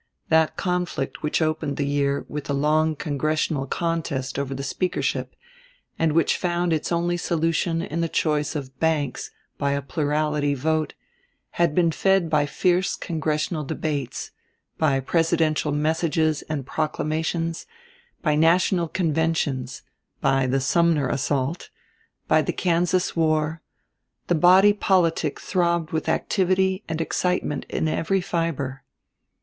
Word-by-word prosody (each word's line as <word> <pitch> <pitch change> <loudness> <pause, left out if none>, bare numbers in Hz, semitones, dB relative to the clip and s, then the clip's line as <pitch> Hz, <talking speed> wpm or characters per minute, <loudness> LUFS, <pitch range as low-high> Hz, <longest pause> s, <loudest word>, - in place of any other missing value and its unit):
That 160 -1 +3
conflict 180 -6 -2
which 150 +2 0
opened 155 -2 -1
the 145 - 0
year 140 0 0
with 150 -1 -5
the 140 - -1
long 155 +2 +2
congressional 150 -1 -1
contest 150 -5 -2
over 135 -1 -3
the 135 - -5
speakership, 180 +6 -2 0.6
and 160 -2 +2
which 165 +1 +2
found 175 -1 0
its 155 +1 -2
only 175 +1 +1
solution 165 0 0
in 165 +1 -3
the 165 - 0
choice 150 -1 0
of 135 -3 -6
Banks 155 -5 0 0.3
by 140 -1 +1
a 140 - -1
plurality 150 0 0
vote, 155 +3 -1 0.6
had 170 -3 +1
been 170 -2 +3
fed 190 -1 +2
by 150 -2 +3
fierce 180 +4 +1
congressional 155 -1 -2
debates, 140 -3 -3 0.5
by 140 -4 +2
presidential 160 0 +1
messages 155 0 +1
and 145 -4 -3
proclamations, 160 +2 -2 0.6
by 155 -3 +2
national 170 +3 +3
conventions, 160 -7 -1 0.4
by 135 -1 +2
the 135 +2 +1
Sumner 155 -1 +2
assault, 140 +3 -1 0.6
by - - +4
the - - -2
Kansas 180 +1 +1
war; 155 -1 +1 0.6
the - - +1
body 185 +5 +6
politic 170 -7 +1
throbbed 170 -3 0
with 160 -1 -1
activity 190 +1 +1
and 160 0 -2
excitement 180 -2 -1
in 160 - -1
every 165 +4 0
fiber. 165 -7 -2
160 Hz, 130 wpm, -24 LUFS, 145-170 Hz, 0.6 s, body